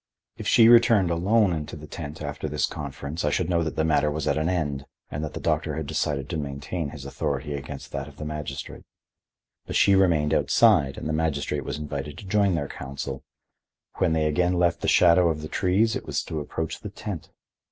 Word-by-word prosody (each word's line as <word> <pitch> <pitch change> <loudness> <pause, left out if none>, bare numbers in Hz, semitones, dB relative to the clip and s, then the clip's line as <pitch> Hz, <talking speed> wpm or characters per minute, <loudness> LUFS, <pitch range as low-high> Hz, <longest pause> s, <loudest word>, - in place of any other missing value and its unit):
If - - -6
she 115 - +6
returned 115 -6 +6
alone 95 +3 +3
into 75 -2 -4
the 75 0 -9
tent 75 0 -7
after 75 +1 -4
this 75 +1 +1
conference 70 +2 -5
I 75 - +2
should 90 +4 0
know 85 -1 +2
that 80 -1 -2
the 80 - +1
matter 75 -2 +2
was 75 0 -3
at - - +2
an 80 +2 0
end 75 -6 -2 0.2
and 75 - -3
that 75 - -5
the - - -3
doctor - - 0
had 80 - -3
decided 70 0 -1
to 85 - -2
maintain 70 +3 -4
his 70 -2 -9
authority 70 +1 -3
against 70 0 -7
that 70 +1 -4
of 75 -1 -14
the 75 - -6
magistrate. 75 -3 -6 0.8
But - - -4
she 100 - +5
remained 85 -6 +3
outside 70 -3 +4
and - - -5
the 80 - -1
magistrate 80 -3 -1
was - - -4
invited 75 -1 -5
to - - -10
join 100 -1 +2
their 70 -4 -2
council; 70 0 -6 0.8
when 80 - +2
they 80 -1 +1
again 90 +4 +2
left 85 -1 +2
the - - -1
shadow 85 0 +5
of 75 -1 -2
the - - -4
trees 100 +6 +1
it - - -5
was - - -1
to 80 - -4
approach 80 +2 -4
the - - -7
tent. - - -7
75 Hz, 215 wpm, -25 LUFS, 70-85 Hz, 0.8 s, she